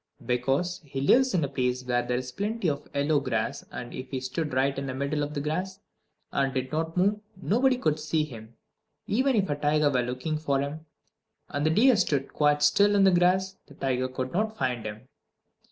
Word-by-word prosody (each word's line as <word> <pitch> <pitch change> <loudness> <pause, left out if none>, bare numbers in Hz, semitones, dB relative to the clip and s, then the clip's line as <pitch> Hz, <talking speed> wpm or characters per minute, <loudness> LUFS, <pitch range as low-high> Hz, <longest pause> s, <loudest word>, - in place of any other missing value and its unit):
Because 135 +9 0
he 135 -2 -6
lives 250 - +4
in 170 - +2
a - - +1
place 130 -2 -1
where 120 -1 +1
there 125 0 -1
is 125 0 -5
plenty 205 - -2
of 145 -2 -2
yellow 145 +1 +2
grass; 130 -4 -2
and 120 -1 -7
if 130 0 -7
he 130 - -3
stood 140 +5 -3
right 135 +2 +1
in 140 0 -4
the 130 - -4
middle 140 +2 -1
of 145 +1 -3
the 145 - -1
grass, 185 +6 -3 0.5
and 135 -1 +1
did 130 0 -3
not 160 +2 -2
move, 200 +3 +2 0.2
nobody 250 +7 +2
could 155 - 0
see 155 0 0
him. 115 -5 -10 0.5
Even 260 +5 +2
if 200 -3 +2
a 145 - -1
tiger 145 0 +2
were 125 -2 +2
looking 130 +6 -3
for 140 -3 0
him, 150 +3 -4 0.6
and 145 +2 -1
the - - +4
deer 240 +10 +5
stood 150 -9 0
quite 150 0 +2
still 200 +8 +4
in 200 - +5
the 190 - +6
grass, 185 +2 +2
the 145 - -15
tiger 130 -2 -1
could 130 0 -5
not 220 +4 -1
find 125 -4 -1
him. 110 +4 -9
145 Hz, 210 wpm, -27 LUFS, 130-180 Hz, 0.6 s, the